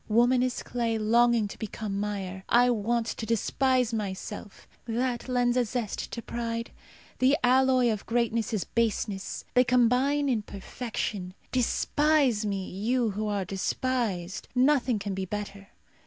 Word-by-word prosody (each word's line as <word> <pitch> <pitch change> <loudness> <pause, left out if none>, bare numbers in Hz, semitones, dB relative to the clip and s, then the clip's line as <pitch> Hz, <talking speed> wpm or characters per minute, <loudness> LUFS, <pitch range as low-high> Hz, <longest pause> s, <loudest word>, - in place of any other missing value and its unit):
Woman 240 +3 +4
is 255 -1 -1
clay 230 -2 -1
longing 230 0 +3
to - - -10
become 210 -2 -4
mire. 195 -2 -4
I 245 +1 +5
want 235 +1 0
to 225 - -4
despise 250 +2 +1
myself. 205 -1 -5 0.2
That 240 +2 -2
lends 245 -1 +2
a 250 - +4
zest 230 -2 -3
to 235 - -5
pride. 230 0 -4 0.5
The 265 +3 +4
alloy 255 -1 +4
of 210 -2 -4
greatness 230 -1 0
is 215 -5 0
baseness. 215 -3 -2
They 250 - +6
combine 250 +4 +3
in 240 -5 +1
perfection. 200 -2 -5 0.2
Despise 255 -2 +2
me, 195 -2 -2
you 230 +4 0
who 210 +2 -3
are 200 -2 -1
despised. 195 -1 -2
Nothing 255 -2 +3
can 200 -1 -4
be 190 0 -3
better. 200 0 -6
230 Hz, 140 wpm, -28 LUFS, 205-250 Hz, 0.5 s, They